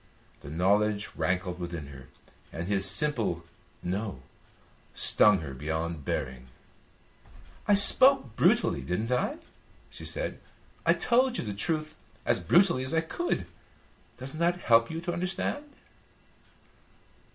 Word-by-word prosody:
The 70 - -12
knowledge 100 +5 0
rankled 90 +2 -3
within 85 -3 -7
her, 70 -1 -14 0.4
and 85 +2 -7
his 95 -1 +1
simple 105 - -2 0.4
"no" 95 - -5 0.7
stung 105 -4 +3
her 70 -4 -8
beyond 80 +3 -5
bearing. 65 0 -5 1.2
"I 205 - +4
spoke 200 - +9
brutally, 70 - +1
didn't 90 - -4
I?" 125 - -2 0.5
she - - -10
said. - - -4 0.5
"I - - +4
told 250 +1 0
you - - -4
the 105 -3 -6
truth 155 - -3 0.3
as - - 0
brutally 175 -8 +2
as 130 +5 -3
I 160 - +1
could. 345 - -4 0.7
Doesn't 135 +4 -7
that 175 +1 -1
help 115 -1 +2
you 160 +1 -6
to 175 0 -5
understand?" 190 +11 -4
105 Hz, 125 wpm, -26 LUFS, -, 1.2 s, spoke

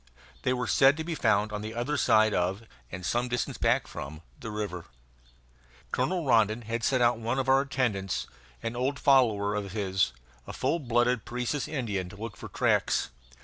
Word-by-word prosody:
They 125 - +1
were 125 -1 -1
said 135 +7 +5
to 160 - -3
be 170 +1 -3
found 110 -6 +2
on 105 - -3
the 110 +1 -6
other 125 +5 -1
side 110 -5 +4
of, 95 +5 0 0.3
and 90 -1 -6
some 120 +5 0
distance 125 0 -2
back - - +2
from, 80 +4 -8 0.2
the 115 - -6
river. 105 -5 -4 1.1
Colonel 170 +6 0
Rondon 115 -2 +3
had 115 +1 -3
sent 130 0 +2
out 120 -1 +3
one 115 +3 -1
of 135 0 -1
our 135 +1 +5
attendants, 110 -9 -1 0.4
an 115 +1 -3
old 130 +3 -1
follower 110 -7 +3
of 100 -2 -3
his, 95 -3 +1 0.4
a - - -6
full 170 - 0
blood 120 -3 +1
Parecis 125 +4 -2
Indian, 105 - -3
to 100 - -12
look 110 +1 -7
for - - -9
tracks. - - +1
115 Hz, 185 wpm, -28 LUFS, 105-130 Hz, 1.1 s, said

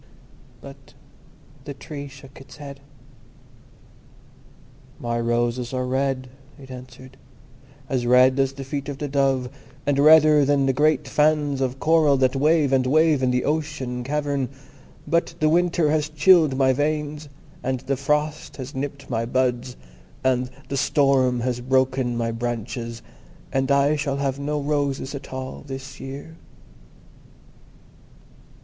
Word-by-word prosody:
But - - -14 0.7
the 140 -2 -6
Tree 140 0 -8
shook 135 -1 -14
its 135 - -14
head. 140 -2 -9 2.2
"My 120 -3 -2
roses 120 +1 -1
are 130 0 -1
red," 130 0 -1 0.3
it 135 -2 -12
answered, 130 +1 -11 0.7
"as 125 -3 -1
red 130 +2 +5
as 135 0 +1
the 135 0 -7
feet 140 +1 -5
of 140 - -5
the 145 - -4
dove, 135 -2 +1 0.4
and 140 -1 +1
redder 155 0 +7
than 140 0 +2
the 135 - +2
great 150 0 +2
fans 150 -1 +1
of 130 0 -2
coral 155 -3 +4
that 130 0 +2
wave 150 0 +3
and 130 -1 +2
wave 155 0 +3
in 130 - +2
the 125 0 0
ocean 150 -5 -2
cavern. 140 -1 -1 0.6
But 170 0 0
the 155 -1 +3
winter 170 -2 +2
has 155 -1 0
chilled 155 -2 +4
my 130 -1 +4
veins, 150 +1 -2 0.3
and 130 -1 -2
the 135 +1 -1
frost 150 +1 -2
has 130 0 -7
nipped 140 0 -5
my 115 -2 -2
buds, 125 0 -1 0.5
and 130 -1 +1 0.2
the 140 - -3
storm 130 -3 +2
has 125 0 -1
broken 130 -1 +1
my 115 -1 -1
branches, 115 0 -4 0.5
and 135 0 0
I 140 +2 +3
shall 140 -2 -2
have 140 -1 -2
no 150 +1 -2
roses 140 -2 -1
at 140 -1 -8
all 130 0 -6
this 135 0 -8
year." 140 +4 -8
135 Hz, 140 wpm, -23 LUFS, 130-145 Hz, 2.2 s, redder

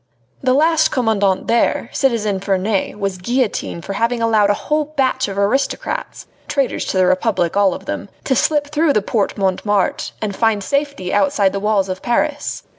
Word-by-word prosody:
The 255 -1 +2
last 315 +1 +3
commandant 210 -6 +1
there, 235 0 +1
citizen 215 -7 0
Ferney, 195 +1 -1
was 195 -2 -3
guillotined 225 -6 -2
for 195 - -4
having 230 +4 0
allowed 220 -3 +3
a 205 - +3
whole 300 +5 -1
batch 265 -3 0
of 195 -1 -6
aristocrats 270 - -1 0.2
traitors 275 -3 -1
to - - -2
the 185 - +4
Republic, 185 -1 +1
all 200 -3 +3
of - - -10
them - - -5
to 265 - +1
slip 295 0 +1
through 305 0 +2
the 210 - +1
Porte 210 -1 -1
Montmartre 195 +1 0
and 210 -2 -3
to - - -12
find 225 -3 +2
safety 280 -8 -2
outside 195 -1 +2
the 200 - -2
walls 205 -1 +1
of 185 0 -5
Paris. 290 +5 -1
215 Hz, 180 wpm, -18 LUFS, 195-270 Hz, 0.2 s, the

